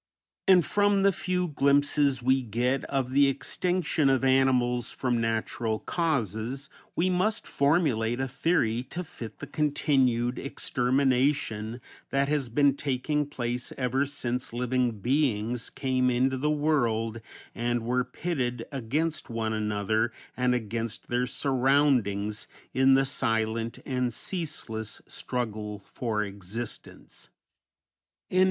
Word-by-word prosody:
And 185 -3 +6
from 205 -1 +3
the 200 - +6
few 180 -1 -1
glimpses 140 -2 +2
we 130 +1 +3
get 125 +3 0
of 135 -2 -1
the 140 +1 +5
extinction 160 +2 0
of 135 -1 +2
animals 130 -2 +3
from 120 -2 0
natural 115 0 -1
causes 135 - -2 0.2
we 175 - +2
must 185 +4 +1
formulate 140 -6 +1
a 135 - 0
theory 125 -4 +1
to 180 - -4
fit 115 - -9
the - - -7
continued 130 -5 +1
extermination 130 -4 0 0.3
that 140 0 +1
has 145 -5 0
been 140 +3 +3
taking 145 +2 -1
place 120 -3 -3
ever 135 +2 +1
since 125 -3 -2
living 125 -3 0
beings 120 -3 0
came 130 -1 0
into 130 +2 +2
the 145 +4 0
world 120 -7 +1 0.3
and 120 0 -1
were 125 +1 +1
pitted 125 -3 -3
against 145 +6 -2
one 115 -1 -2
another 110 +1 0 0.2
and 125 0 +2
against 115 -1 -4
their 125 +1 +1
surroundings 125 -6 +1 0.3
in 135 0 +5
the 135 0 +3
silent 115 -3 0
and 125 -2 0
ceaseless 145 - -3
struggle 105 -4 -4
for 110 -4 -2
existence. 100 +3 -7 1.0
THE 185 - 0
END. - - +6
125 Hz, 120 wpm, -28 LUFS, 115-140 Hz, 1.0 s, And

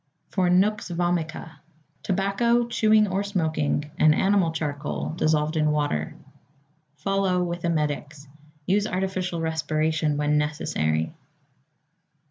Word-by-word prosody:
=For 185 -2 +1
Nux 195 +4 +3
Vomica.= 170 -2 -2 0.4
Tobacco, 200 +5 +1
chewing 215 -2 +3
or 190 +1 -1
smoking, 155 -6 -1
and 155 0 +5
animal 190 -3 +2
charcoal, 150 -3 -3
dissolved 155 -1 +1
in 155 -1 +2
water. 145 - -1 0.8
Follow 195 0 0
with 175 0 -4
emetics. 150 -3 -2 0.4
Use 205 +3 +2
artificial 185 -3 -2
respiration 155 -1 0
when 150 0 +2
necessary. 80 - -1
165 Hz, 100 wpm, -25 LUFS, 150-190 Hz, 0.8 s, and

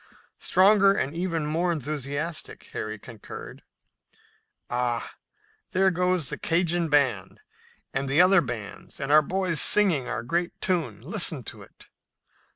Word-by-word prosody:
"Stronger 195 +1 +5
and 145 -5 -2
even 165 -3 -2
more 165 +4 0
enthusiastic," 150 +1 -4
Harry 110 0 -4
concurred. 110 0 -10 1.1
"Ah, 120 -1 -2 0.6
there 190 0 +3
goes 180 -4 0
the - - -5
Cajun 170 0 0
band 130 -10 +1 0.5
and 135 0 -2
the 140 +4 +2
other 185 0 +6
bands 110 -8 -7
and 140 0 -3
our 155 +1 +7
boys 180 0 +1
singing 175 -12 +4
our 120 -2 -3
great 170 +8 -2
tune! 165 - -1
Listen - - 0
to - - -8
it!" - - -17
155 Hz, 130 wpm, -26 LUFS, 130-180 Hz, 1.1 s, our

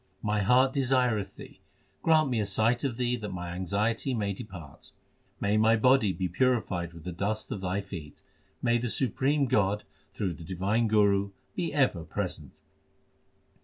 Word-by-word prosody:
My 105 0 +1
heart 130 +6 +4
desireth 125 -6 +1
Thee; - - -13 0.4
grant 155 -4 +3
me 120 - +1
a 105 - 0
sight 110 +5 +2
of 130 -5 -1
Thee 125 -1 +1
that 105 -3 -5
my 90 -1 -5
anxiety 100 +8 -1
may 100 -3 -1
depart. 95 - -10 0.5
May 100 +1 +1
my 110 +1 +5
body 115 -2 +4
be 95 0 -2
purified 90 -5 0
with 85 -2 -12
the 90 - -5
dust 105 +5 -3
of 100 - -4
Thy 95 +2 -1
feet! 95 -7 -9 0.4
May 120 -1 +3
the 120 0 -2
supreme 135 +4 +1
God 105 -5 +1 0.3
through 95 -4 -2
the 85 - -11
divine 95 +6 0
Guru 100 -2 +3 0.2
be 170 -3 -2
ever 135 - +1
present - - -5
105 Hz, 165 wpm, -28 LUFS, 95-125 Hz, 0.5 s, my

